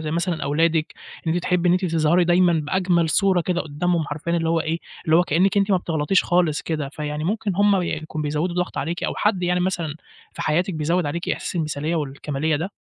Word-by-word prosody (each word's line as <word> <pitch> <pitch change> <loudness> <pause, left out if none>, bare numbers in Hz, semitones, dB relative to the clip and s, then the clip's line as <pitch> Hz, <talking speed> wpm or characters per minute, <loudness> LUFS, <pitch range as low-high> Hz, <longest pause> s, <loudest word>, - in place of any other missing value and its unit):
زي 155 - -2
مثلًا 170 +1 -1
أولادِك، 160 +2 +1 0.3
إن 160 - +2
أنتِ 175 - -1
تحبّي 180 -1 +1
إن - - +5
أنتِ 185 +1 +1
تظهري 165 +1 +2
دايمًا 175 0 +4
بأجمل 170 +2 +1
صورة 190 +2 +3
كده 175 +1 -1
قدّامهم، 160 +2 -1
حرفيًا 155 +4 -2
اللي 165 -1 0
هو 165 0 +2
إيه، 160 +1 -2 0.3
اللي 160 0 +4
هو 175 - +5
كأنِّك 180 +4 +2
أنتِ 200 +1 +2
ما 190 - +5
بتغلطيش 165 +1 +1
خالص 175 -4 +1
كده، 155 -4 -3
فيعني 150 +1 -4
ممكن 210 +2 -1
هُم 200 -2 +3
يكونوا 155 -2 -4
بيزوّدوا 150 +4 -1
الضغط 180 0 -2
عليكِ، 165 +5 -3
أو - - -1
حد 205 -3 +1
يعني 180 0 +1
مثلًا 175 -4 -1 0.4
في - - -5
حياتِك 175 +4 0
بيزوّد 165 +2 0
عليكِ 170 +4 -3
إحساس - - -3
المثالية 155 0 -2
والكمالية 145 +1 -2
ده؟ 175 +6 -4
170 Hz, 210 wpm, -22 LUFS, 155-180 Hz, 0.4 s, إن